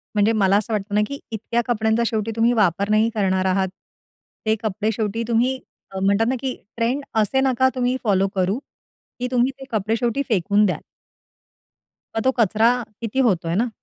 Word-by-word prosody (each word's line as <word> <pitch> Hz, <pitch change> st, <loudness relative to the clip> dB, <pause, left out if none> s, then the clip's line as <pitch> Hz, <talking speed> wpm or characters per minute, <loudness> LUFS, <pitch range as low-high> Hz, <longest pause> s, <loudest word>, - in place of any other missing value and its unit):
म्हणजे 210 Hz, +1 st, +3 dB
मला 200 Hz, -2 st, +3 dB
असं 215 Hz, +2 st, -2 dB
वाटतं 205 Hz, 0 st, -2 dB
ना, 210 Hz, -, +4 dB
की 280 Hz, +3 st, -6 dB
इतक्या 230 Hz, +2 st, -1 dB
कपड्यांचा 220 Hz, -1 st, +1 dB
शेवटी 220 Hz, -1 st, -1 dB
तुम्ही 230 Hz, +1 st, +3 dB
वापर 200 Hz, -2 st, +2 dB
नाही 215 Hz, +2 st, +3 dB
करणार 190 Hz, -2 st, +1 dB
आहात. 190 Hz, 0 st, +2 dB, 0.8 s
ते 220 Hz, 0 st, +3 dB
कपडे 215 Hz, +1 st, -1 dB
शेवटी 220 Hz, +1 st, -2 dB
तुम्ही 245 Hz, +3 st, +1 dB, 0.3 s
अ, 190 Hz, -, -5 dB
म्हणतात 200 Hz, +3 st, +2 dB
ना, 260 Hz, -, +1 dB
की 260 Hz, -1 st, -3 dB, 0.2 s
ट्रेंड 240 Hz, +5 st, 0 dB, 0.2 s
असे 240 Hz, +6 st, +1 dB
नका 260 Hz, -1 st, +3 dB
तुम्ही 250 Hz, 0 st, +1 dB
फॉलो 195 Hz, -3 st, +2 dB
करू, 190 Hz, +3 st, +1 dB, 0.6 s
की 250 Hz, -, -1 dB
तुम्ही 250 Hz, +1 st, +2 dB
ते -, -, -8 dB
कपडे 220 Hz, 0 st, 0 dB
शेवटी 240 Hz, +3 st, 0 dB
फेकून 205 Hz, 0 st, +3 dB
द्याल. 185 Hz, -, -1 dB, 1.4 s
मग 225 Hz, -, 0 dB
तो 260 Hz, -, +5 dB
कचरा 225 Hz, +2 st, +4 dB, 0.3 s
किती 230 Hz, +3 st, -2 dB
होतोय 170 Hz, -5 st, 0 dB
ना? 235 Hz, +5 st, +1 dB
220 Hz, 180 wpm, -22 LUFS, 200-235 Hz, 1.4 s, तो